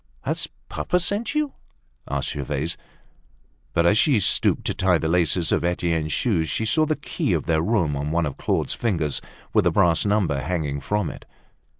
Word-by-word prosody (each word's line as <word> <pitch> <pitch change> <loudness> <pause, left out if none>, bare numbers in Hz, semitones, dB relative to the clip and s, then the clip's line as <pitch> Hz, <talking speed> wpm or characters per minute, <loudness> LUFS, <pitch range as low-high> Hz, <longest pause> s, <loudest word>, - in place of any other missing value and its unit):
"Has - - -1 0.2
papa 180 - 0
sent 205 - -1
you?" 300 -2 0 0.6
asked 70 0 -1
Gervaise. 70 -3 -3 1.0
But 85 - +2
as 105 +5 +4
she 140 -8 +4
stooped 95 - +2
to - - 0
tie 95 -2 +2
the 80 - -2
laces 85 0 +2
of - - +1
Etienne's 85 -3 0
shoes, 85 - +1
she 110 +11 -1
saw 155 +8 +3
the 155 - +1
key 145 - -2
of - - -1
their 80 -2 +2
room 85 -6 +1
on 70 +1 -2
one 85 +1 +1
of 70 - -4
Claude's - - -1
fingers, 85 - -1 0.3
with - - +4
the - - +4
brass 85 -1 +3
number 100 -9 +1
hanging 75 -2 -2
from 105 +5 -1
it. - - -12
85 Hz, 185 wpm, -23 LUFS, 80-110 Hz, 1.0 s, as